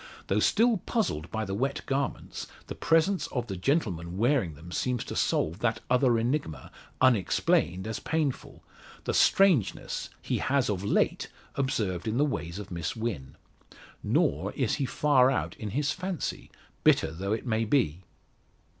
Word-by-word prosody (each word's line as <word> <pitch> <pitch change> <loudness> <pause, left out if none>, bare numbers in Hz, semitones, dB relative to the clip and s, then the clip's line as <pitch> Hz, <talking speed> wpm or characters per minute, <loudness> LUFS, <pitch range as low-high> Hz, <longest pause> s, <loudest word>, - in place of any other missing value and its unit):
Though - - +1
still 230 +1 +3
puzzled 180 - -2
by 110 0 -2
the 95 - -4
wet 135 +7 -1
garments, 135 0 -3 0.2
the - - -6
presence 165 +4 +2
of 125 -3 -3
the 100 - -5
gentleman 90 - -1
wearing 115 - +2
them 85 +4 -12
seems 125 +5 -1
to - - -7
solve 80 +5 0
that 115 -1 0
other 125 -2 +4
enigma, 115 - -2 0.3
unexplained 95 -6 +2
as 110 0 -3
painful 155 -5 -2 0.4
the - - -1
strangeness 185 - +3
he - - -2
has 135 -4 +1
of 95 -2 -3
late 100 - +1 0.3
observed 105 -9 -1
in 110 +2 0
the 145 - +4
ways 85 - -3
of 105 -2 -8
Miss 85 -2 -3
Wynn. 110 - -4 0.7
Nor - - +1
is - - 0
he 135 - +1
far 130 -2 +4
out 135 - -1
in 110 - -5
his 140 +7 0
fancy, 185 0 -4 0.3
bitter - - +4
though 95 +6 -2
it 115 +3 -4 0.2
be. 90 - +2
120 Hz, 155 wpm, -28 LUFS, 95-140 Hz, 0.7 s, other